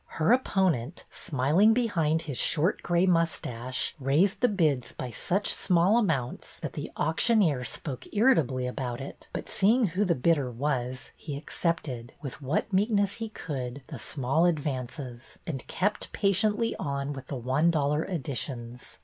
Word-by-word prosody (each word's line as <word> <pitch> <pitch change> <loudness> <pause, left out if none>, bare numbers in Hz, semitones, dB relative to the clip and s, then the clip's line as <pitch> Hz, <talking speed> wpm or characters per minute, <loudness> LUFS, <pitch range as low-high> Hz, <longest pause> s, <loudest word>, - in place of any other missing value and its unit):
Her 165 +5 +3
opponent, 185 - +1
smiling 165 - +3
behind 165 -10 +1
his 145 -6 -4
short 165 +5 +2
gray 175 +1 +2
mustache, 140 -8 0
raised 170 +10 +2
the 245 - +5
bids 155 - +1
by 125 - -5
such 190 - 0
small 190 +4 +3
amounts 140 - -2
that - - -4
the - - -5
auctioneer 160 - +2
spoke 130 +1 -4
irritably 160 - +3
about 125 -2 -3
it, 135 - -9
but - - -5
seeing 220 +2 +3
who 185 +5 0
the 180 -4 +2
bidder 140 -1 +2
was, 125 0 -2
he 145 -3 -6
accepted, 145 -6 -3
with 140 -1 -7
what 150 - -1
meekness 200 0 +2
he 225 -1 -4
could, 135 - -5
the 145 -6 -7
small 135 +7 +1
advances, 135 -5 -3
and 135 -6 -5
kept 205 +3 -1
patiently 210 +3 +1
on 140 0 -2
with 135 -2 -9
the 140 - -4
one 130 +7 +2
dollar 150 -1 +1
additions. 125 -7 -5
155 Hz, 150 wpm, -28 LUFS, 130-190 Hz, -, the